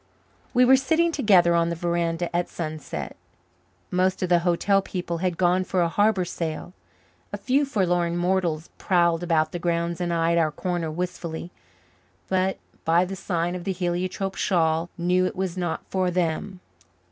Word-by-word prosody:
We 250 0 +5
were 265 +1 +7
sitting 320 +6 +2
together 195 - +4
on 170 0 +2
the 170 - -2
veranda 170 0 -1
at 175 0 0
sunset. 155 -2 -5 0.8
Most 185 +1 +1
of 185 - -1
the 175 -1 +5
hotel 180 +3 +2
people 175 -3 -4
had 180 -1 -1
gone 180 +1 +3
for 185 -1 0
a - - +2
harbour 205 0 +2
sail; 170 0 -5 0.6
a - - -3
few 275 +3 +1
forlorn 175 -8 0
mortals 175 -3 0
prowled 170 -2 +2
about 160 -3 +1
the 175 - -4
grounds 170 0 -1
and 175 -1 -1
eyed 170 0 +2
our 160 -2 +2
corner 175 0 -2
wistfully, 175 0 -5 0.8
but 190 0 +1 0.3
by 170 +2 +3
the 195 +1 -5
sign 175 -2 -2
of 180 -1 -5
the 190 +1 -1
heliotrope 185 +2 -2
shawl 165 -3 +1
knew 180 +1 +2
it - - -5
was 185 -2 -2
not 175 -3 -3
for 185 -1 0
them. 180 +2 -2
175 Hz, 165 wpm, -25 LUFS, 170-185 Hz, 0.8 s, were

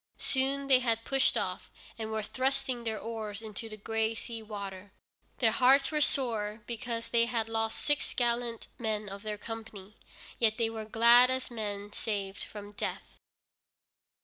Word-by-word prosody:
Soon 275 +1 +1
they 265 -2 +6
had 230 -2 0
pushed 270 0 +3
off, - - -3 0.3
and 220 -1 -5
were 220 -1 -2
thrusting 260 +1 -1
their 220 -1 -1
oars 215 -2 -5
into 220 +1 -6
the 215 - -7
gray 225 +2 -1
sea 230 0 -6
water. 200 -2 -7 0.5
Their 225 -3 +3
hearts 270 +4 +5
were 305 -1 +1
sore, 225 -6 +1
because 235 -1 -4
they 235 -1 +3
had 230 -2 -1
lost 225 0 -1
six 295 -1 +1
gallant 235 -1 0
men 215 -2 -1
of 195 0 -7
their 210 0 -4
company, 215 -2 -8 0.4
yet 220 -2 +3
they 225 -1 +1
were 220 -1 -5
glad 235 +3 +7
as 260 -1 -1
men 205 -2 -4
saved 200 -2 -3
from 205 -1 -8
death. 205 - -5
225 Hz, 160 wpm, -31 LUFS, 215-245 Hz, 0.5 s, glad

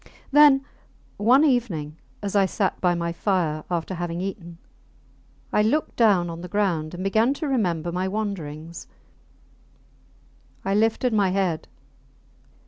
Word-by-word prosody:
Then, 280 -1 +6 0.5
one 250 +8 +5
evening, 195 - 0 0.3
as 200 0 -3
I 195 -1 +4
sat 195 +1 -2
by 180 -1 +2
my 170 0 -2
fire 165 -5 -1
after 175 +1 -2
having 175 -1 -4
eaten, 180 -3 -6 1.0
I - - +4
looked 260 +9 0
down 200 -7 +3
on 165 0 -7
the 180 - -7
ground 175 -5 -1
and 180 - -5
began 220 +7 +2
to 305 +2 -4
remember 175 - 0
my 180 +2 -1
wanderings. 170 -6 -5 1.8
I 195 - 0
lifted 225 +3 +1
my 200 -3 +3
head. 185 -4 -1
190 Hz, 135 wpm, -24 LUFS, 170-220 Hz, 1.8 s, Then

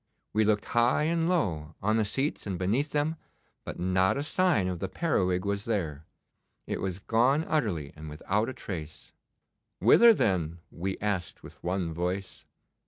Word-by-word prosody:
We 110 0 +3
looked 105 0 +2
high 120 +5 +2
and 165 +1 +1
low, 80 - -1
on 110 +3 +1
the 110 - +2
seats 135 +3 -2
and 95 -3 -2
beneath 110 - 0
them, 150 +2 0 0.5
but - - -7
not 95 +4 +2
a 140 - -1
sign 165 - +2
of 90 -2 -3
the 95 - -3
periwig 95 - 0
was 100 0 -1
there. 80 -9 -2 0.6
It - - -3
was 95 -2 -2
gone 125 +9 +2
utterly 95 - -1
and 80 0 -8
without 100 +9 -1
a - - -5
trace.' 80 -9 -8 0.7
'Whither 230 - +7
then?' 85 - +1
we 95 +3 -3
asked 95 -4 -2
with - - -13
one 90 -2 -1
voice. 90 +3 -4
100 Hz, 165 wpm, -28 LUFS, 90-130 Hz, 0.7 s, Whither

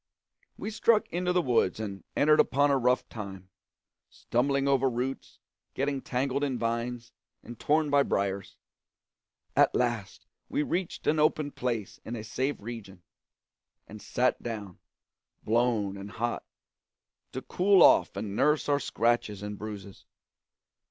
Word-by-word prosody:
We 215 - -5
struck 220 0 +3
into 180 +1 -1
the 180 -1 +2
woods 115 - +2
and 100 -3 -5
entered 150 +1 +4
upon 145 +2 +4
a 140 - +4
rough 125 +1 +2
time, 95 -4 -8 0.6
stumbling 135 +3 0
over 135 -1 +3
roots, 125 +2 -4 0.4
getting 140 0 -1
tangled 135 +3 -1
in 135 -3 0
vines, 115 +1 -3 0.3
and 120 - -10
torn 150 0 +2
by 140 0 +5
briers. 100 -5 -2 1.0
At - - +4
last 120 -5 -1 0.2
we 150 - 0
reached 175 +3 -3
an 155 +1 +2
open 150 -1 +2
place 120 -6 -3
in 115 - -5
a 110 - -6
safe 130 +5 -2
region, 100 -5 -9 0.8
and 105 0 -10
sat 125 +1 0
down, 105 -6 -6 0.6
blown 110 -4 +1
and 100 +1 -8
hot, 120 +3 -3 0.9
to 130 - -5
cool 190 0 +4
off - - +5
and 100 0 -4
nurse 150 +5 +2
our 145 -1 +2
scratches 115 -6 0
and 105 0 -4
bruises. 100 -2 -9
120 Hz, 140 wpm, -29 LUFS, 105-140 Hz, 1.0 s, by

